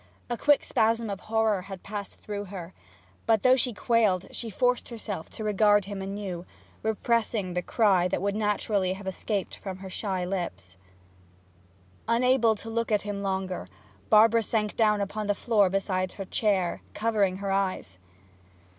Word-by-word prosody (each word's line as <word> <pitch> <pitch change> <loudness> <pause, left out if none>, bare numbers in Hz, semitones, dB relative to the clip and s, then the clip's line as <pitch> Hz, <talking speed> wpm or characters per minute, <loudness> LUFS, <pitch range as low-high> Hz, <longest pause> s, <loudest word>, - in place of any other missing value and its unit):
A - - +1
quick 290 +4 +3
spasm 225 0 +1
of 195 - -4
horror 220 -2 +1
had 195 -1 -9
passed 205 -1 -6
through 205 -1 -6
her; 185 -2 -8 0.5
but 220 -2 +3
though 255 0 +7
she 255 -1 +1
quailed 215 -5 +2
she 230 - -6
forced 250 +4 +1
herself 210 -7 -6
to 220 - -7
regard 205 -1 +4
him 200 -1 -5
anew, 195 -3 -4 0.4
repressing 220 -3 0
the 180 - 0
cry 190 -4 +3
that - - -1
would 200 +1 -1
naturally 210 -3 0
have 195 +1 -9
escaped 190 +1 -3
from 190 -2 -6
her 190 0 -8
ashy 185 -1 -2
lips. 95 - -4 1.3
Unable 235 -1 +3
to 225 +2 -9
look 230 0 -1
at 210 -1 +2
him 205 -1 -4
longer, 190 - -2 0.4
Barbara 225 +2 +6
sank 215 -1 -1
down 210 -2 +3
on 215 -1 -3
the 205 - +2
floor 205 -3 +3
beside 185 -1 -1
her 195 - -6
chair, 190 -3 0
covering 210 -4 +1
her 200 0 -3
eyes. 185 - -1
205 Hz, 160 wpm, -27 LUFS, 190-220 Hz, 1.3 s, though